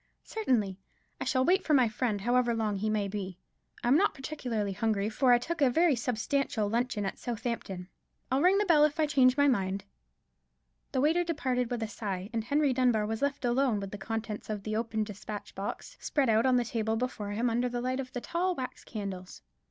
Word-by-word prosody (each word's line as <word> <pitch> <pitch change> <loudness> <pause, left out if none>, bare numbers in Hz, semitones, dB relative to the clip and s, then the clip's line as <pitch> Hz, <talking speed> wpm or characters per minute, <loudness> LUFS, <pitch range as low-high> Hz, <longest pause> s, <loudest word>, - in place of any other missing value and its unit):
"Certainly; 225 - 0 0.4
I - - -3
shall 260 -1 +2
wait 375 +2 +3
for 305 - +3
my 255 -3 +5
friend, 215 -2 -1
however 240 +1 +2
long 215 -3 -1
he 215 +3 -1
may 210 -2 0
be. 195 -2 -5 0.5
I'm 245 +3 +4
not 395 +7 +3
particularly 245 -8 -3
hungry, 210 0 0
for 250 +3 +3
I 245 - +7
took 325 +6 -4
a 275 - +6
very 320 +3 +3
substantial 240 -1 -1
luncheon 230 -1 -1
at 195 - -4
Southampton. 225 -6 -4 0.4
I'll 265 +2 +2
ring 370 +4 +5
the 415 - +2
bell 320 -5 +5
if 300 +1 +2
I 310 - +4
change 265 -3 +4
my 285 0 +5
mind." 195 -6 0 1.1
The 260 - +1
waiter 325 +5 +3
departed 260 -7 -1
with 240 -2 -2
a - - -2
sigh; 200 -2 -5
and 225 -1 -1
Henry 285 +3 +2
Dunbar 245 -4 +2
was 220 +1 -3
left 280 -2 -1
alone 240 -2 +2
with 195 -1 -6
the 205 - -7
contents 220 +1 -4
of 210 -2 -3
the 215 +1 -2
open 220 -1 -1
despatch 210 0 -7
box 205 - -6
spread 275 -5 +1
out 225 +3 +4
on 255 - +4
the 245 -1 +2
table 225 -1 -1
before 225 -3 -3
him 230 +4 0
under 240 +2 +1
the 245 0 -3
light 255 +2 -1
of 255 -1 -5
the 245 - -4
tall 360 +5 -1
wax 255 -4 -6
candles. 195 -4 -6
240 Hz, 210 wpm, -30 LUFS, 215-270 Hz, 1.1 s, I